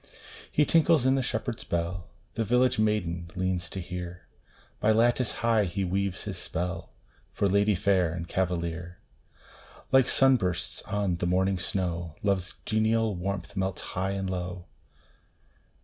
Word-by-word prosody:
He 150 - +3
tinkles 160 -4 +4
in 130 - +5
the 135 - +2
shepherd 115 -1 -2
s - - -6
bell 85 +1 -2 0.3
The 115 - -1
village 125 +2 +2
maiden 90 -6 0
leans 90 -1 -1
to 95 - -5
hear 90 0 -6 0.5
By 110 - +3
lattice 120 +2 +3
high 115 -3 +4
he 95 +2 -2
weaves 95 +1 -1
his - - -5
spell, 90 +2 -4 0.4
For 100 - 0
lady 100 +2 +3
fair 95 -3 +2
and 85 0 -5
cavalier: 90 -1 -2 0.9
Like 130 -1 +5
sun 135 -1 +6
bursts 90 -6 -2
on 100 -3 0
the 85 - -1
mountain 95 +1 +2
snow, 85 -4 -2
Love 100 -2 +3
s 90 0 -8
genial 110 0 +2
warmth 100 +3 -4
melts 95 -1 -2
high 95 +1 -1
and 95 -1 -2
low. 90 -1 -4
95 Hz, 150 wpm, -28 LUFS, 90-110 Hz, 0.9 s, sun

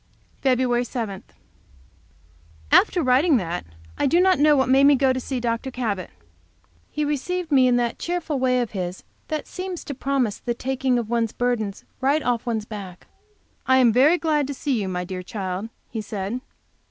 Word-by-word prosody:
Feb. 250 -2 +2
7. 220 -7 -4 1.5
After 350 - +5
writing 270 +4 +4
that, 175 -4 -3 0.4
I - - +3
do 335 +5 +3
not 370 -2 +4
know 300 0 +5
what 265 -2 +2
made 270 +2 +5
me 285 0 +7
go 265 -1 +3
to 255 - -2
see 260 0 -3
Dr. 235 +2 -2
Cabot. 220 -7 -3 0.8
He 300 - -2
received 325 +4 -2
me 260 -3 +5
in 245 - +3
that 240 -1 0
cheerful 340 -5 -2
way 255 -1 +2
of 240 - -3
his 180 -2 -4 0.2
that 310 -1 -3
seems 365 -1 -6
to 285 - -5
promise 265 -5 -1
the 240 - -3
taking 255 -1 0
one's 230 -1 0
burden 235 -5 -1 0.2
right 280 +3 +2
off 245 -1 -1
one's 220 -3 -1
back. 195 -5 -9 0.6
"I 260 - +5
am 245 -4 +5
very 285 +8 +5
glad 300 -4 +1
to 285 - -4
see 260 -5 -1
you, 190 - -3
my 180 -1 -2
dear 185 0 -5
child," 190 +2 -4 0.2
he 225 - -3
said. 210 +3 -4
250 Hz, 175 wpm, -23 LUFS, 220-280 Hz, 1.5 s, me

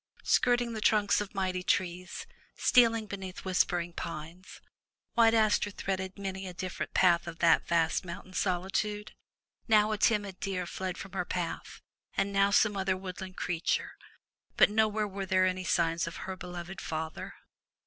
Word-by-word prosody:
Skirting 245 -1 +2
the 220 - -4
trunks 210 -1 +3
of 205 0 -7
mighty 185 -1 -1
trees, 180 0 -1 0.3
stealing 230 -3 +4
beneath 195 -3 -7
whispering 175 -2 +1
pines. 170 +3 -7 0.5
White 230 -1 +5
Aster 215 -2 +3
threaded 190 -1 -4
many 190 -1 -5
a 180 - -8
different 185 0 -5
part 175 -2 +4
of 165 -1 -6
that 170 -1 +4
vast 165 0 +2
mountain 180 +1 -8
solitude. 195 +3 -1 0.6
Now 215 -1 +4
a 215 - -2
timid 205 -4 +1
deer 190 -3 -2
fled 185 +1 -4
from 195 - -8
her - - -1
path, 175 -1 -5 0.3
and 200 +1 0
now 195 0 +4
some 205 +1 +3
other 190 -1 0
woodland 185 0 -7
creature, 165 0 -1 0.7
but - - +6
nowhere 215 0 +2
were 195 -1 -5
there 185 0 +3
any 185 0 -1
signs 165 -2 +1
of 165 - -6
her 190 - -4
beloved 180 0 -7
father. 160 0 -5
190 Hz, 155 wpm, -30 LUFS, 180-205 Hz, 0.7 s, but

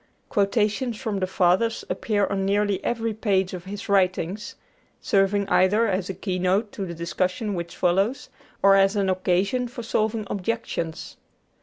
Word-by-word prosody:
Quotations 210 +3 +1
from 215 -6 -3
the 185 - 0
Fathers 190 +5 +1
appear 205 -3 0
on 195 -1 -2
nearly 200 0 +1
every 230 -1 -1
page 195 -4 0
of 180 -1 -7
his 200 +1 -7
writings, 190 0 0 0.4
serving 200 0 +2
either 205 +4 +3
as 190 -3 -1
a 190 - -3
keynote 190 +3 0
to 195 - -5
the 170 - -6
discussion 185 +6 -2
which 170 -2 -5
follows, 195 +8 +1 0.3
or 195 0 +7
as 195 +1 +4
an 195 -2 +1
occasion 185 +7 0
for 240 0 -8
solving 220 -1 -1
objections. 195 -5 -4
195 Hz, 150 wpm, -24 LUFS, 185-215 Hz, 0.4 s, or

